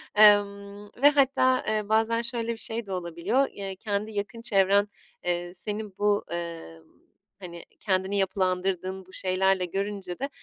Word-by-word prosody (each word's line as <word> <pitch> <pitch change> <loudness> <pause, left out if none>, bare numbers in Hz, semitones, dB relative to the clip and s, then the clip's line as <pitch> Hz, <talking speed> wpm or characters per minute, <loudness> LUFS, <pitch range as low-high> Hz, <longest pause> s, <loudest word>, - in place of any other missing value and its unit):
emm, 205 -1 +4
ve 290 - +10
hatta, 265 -2 +3
eee, 215 -1 -1
bazen 225 +1 +2
şöyle 235 -1 -3
bir 230 - -5
şey 225 0 -4
de 195 - -9
olabiliyor, 180 +9 0
eee, 195 -1 -6
kendi 210 +2 -3
yakın 205 +2 -4
çevren, 200 -2 +3 0.4
eee, 175 0 -2
senin 210 +1 -5
bu, 205 0 +2
eee, 170 - -6 0.6
hani 170 -2 -9 0.2
kendini 190 0 0
yapılandırdığın 185 -1 -1
bu 185 - -19
şeylerle 190 0 +1
görünce 195 -1 -4
de 275 +2 -2
200 Hz, 145 wpm, -27 LUFS, 185-215 Hz, 0.6 s, ve